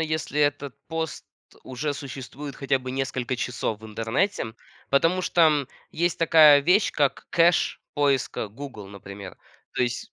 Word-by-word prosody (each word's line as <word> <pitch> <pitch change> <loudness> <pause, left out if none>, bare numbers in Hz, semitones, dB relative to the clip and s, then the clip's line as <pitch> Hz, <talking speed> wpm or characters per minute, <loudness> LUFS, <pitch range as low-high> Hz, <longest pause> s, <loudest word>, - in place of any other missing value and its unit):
если 155 -2 -1
этот 145 -2 0
пост 160 -1 -4 0.4
уже 145 +3 -3
существует 140 +1 -8
хотя 135 -1 0
бы 130 0 -7
несколько 130 -1 -2
часов 110 -3 -3
в 110 - -10
интернете, 115 - -1 0.4
потому 165 +7 +3
что 155 -6 +3 0.2
есть 170 +1 -1
такая 155 -3 +7
вещь, 180 +8 +3
как 145 -2 0
кэш 170 +1 +3
поиска 140 -6 0
"Гугл" 110 -3 -9
например. 100 -1 -10 0.4
То - - +2
есть 120 -1 -3
140 Hz, 135 wpm, -25 LUFS, 125-155 Hz, 0.4 s, такая